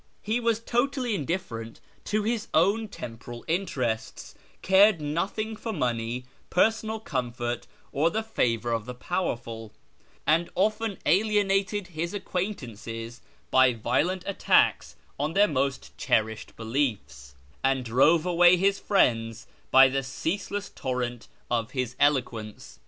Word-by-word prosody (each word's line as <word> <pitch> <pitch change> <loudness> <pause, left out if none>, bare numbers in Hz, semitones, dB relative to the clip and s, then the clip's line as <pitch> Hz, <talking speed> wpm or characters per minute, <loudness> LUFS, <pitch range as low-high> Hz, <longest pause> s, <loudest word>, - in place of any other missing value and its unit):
He 220 +3 0
was 230 -2 +1
totally 245 +1 0
indifferent 140 - -4 0.3
to 215 0 0
his 225 0 -1
own 200 +7 +3
temporal 120 - -9
interests; 140 - -2 0.3
cared 190 -1 +5
nothing 190 +9 -2
for 225 +1 -5
money, 125 - -2 0.2
personal 220 +3 +1
comfort, 120 - -3 0.2
or 155 +4 +2
the 220 +4 -2
favour 120 - 0
of 115 -1 -2
the 125 - -6
powerful; 120 - -3 0.5
and 165 +4 +2
often 215 +1 0
alienated 200 +1 +2
his 170 +3 -4
acquaintances 120 - -5 0.3
by 130 -1 +5
violent 155 - 0
attacks 75 - +2 0.2
on 150 +3 -1
their 205 +3 +5
most 140 -3 -2
cherished 110 -3 0
beliefs, 105 - -3 0.3
and 135 -1 +1
drove 150 +8 +4
away 175 0 +6
his 195 +2 +2
friends 115 - +1 0.2
by 135 0 +8
the 135 +1 -1
ceaseless 195 +9 -3
torrent 125 -2 -3 0.2
of 115 -1 0
his 125 -2 -2
eloquence. 120 -7 -1
145 Hz, 120 wpm, -27 LUFS, 120-200 Hz, 0.5 s, by